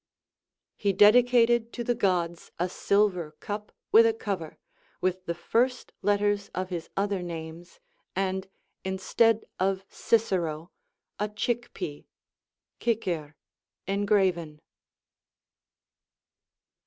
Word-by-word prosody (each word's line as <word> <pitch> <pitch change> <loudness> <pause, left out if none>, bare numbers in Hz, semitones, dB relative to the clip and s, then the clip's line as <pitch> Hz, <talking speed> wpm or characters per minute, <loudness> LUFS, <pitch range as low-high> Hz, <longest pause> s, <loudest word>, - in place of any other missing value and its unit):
He 200 -1 +1
dedicated 235 +2 +5
to 240 - -3
the 240 - +1
Gods 180 -6 0
a 180 +2 0
silver 180 -6 +1
cup 210 0 -5 0.2
with 230 +1 +8
a 225 - +1
cover, 190 -8 -4 0.4
with 185 0 -1
the 170 - -1
first 250 +8 0
letters 205 0 +1
of 185 0 -3
his 170 -2 -4
other 200 -1 0
names, 165 - -7 0.4
and 190 0 -1 0.4
instead 210 +4 +2
of 190 +1 0
Cicero 175 -7 0 0.5
a 210 +1 0
chick 240 +3 -2
pea 150 -5 -6 0.7
(cicer) 175 -10 -1 0.5
engraven. 190 -6 +1
195 Hz, 100 wpm, -28 LUFS, 175-215 Hz, 0.7 s, with